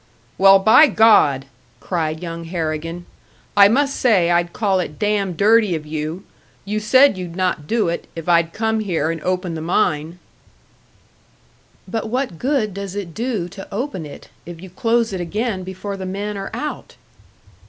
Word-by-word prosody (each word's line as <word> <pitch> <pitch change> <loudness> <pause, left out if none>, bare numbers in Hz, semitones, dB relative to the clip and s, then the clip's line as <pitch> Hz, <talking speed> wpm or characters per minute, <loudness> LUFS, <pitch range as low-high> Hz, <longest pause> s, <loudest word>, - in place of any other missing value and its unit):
"Well, 195 0 +8
by 220 +10 +6
God!" 205 - +4 0.3
cried 160 -2 -3
young 165 -1 -6
Harrigan. 165 0 -4 0.5
"I 200 -1 +8
must 275 +6 +1
say 190 -9 +3
I'd 175 0 +1
call 195 -2 0
it 155 -4 -4
damned 200 -4 -1
dirty 210 -2 +4
of 155 -1 -6
you! 155 +4 -5 0.4
You 210 +2 -2
said 235 0 +4
you'd 175 -2 -7
not 180 -5 -1
do 225 0 +1
it, 170 - -3
if 165 0 -7
I'd 170 -1 +3
come 220 +2 -1
here 165 -7 -1
and 165 -1 -6
open 185 0 -2
the 160 - -5
mine!" 160 -1 0 1.7
"But 225 -1 -3
what 250 -8 -3
good 255 -7 0
does 200 0 -6
it 190 -5 -5
do 225 -5 -2
to 195 +1 -11
open 205 - -4
it, 145 - -12
if 175 -1 -10
you 185 +1 -11
close 230 +2 0
it 185 - -3
again 205 +3 -2
before 190 +2 -6
the 190 -1 -6
men 205 +2 -4
are 195 0 -5
out?" 295 +7 -6
190 Hz, 165 wpm, -20 LUFS, 170-215 Hz, 1.7 s, Well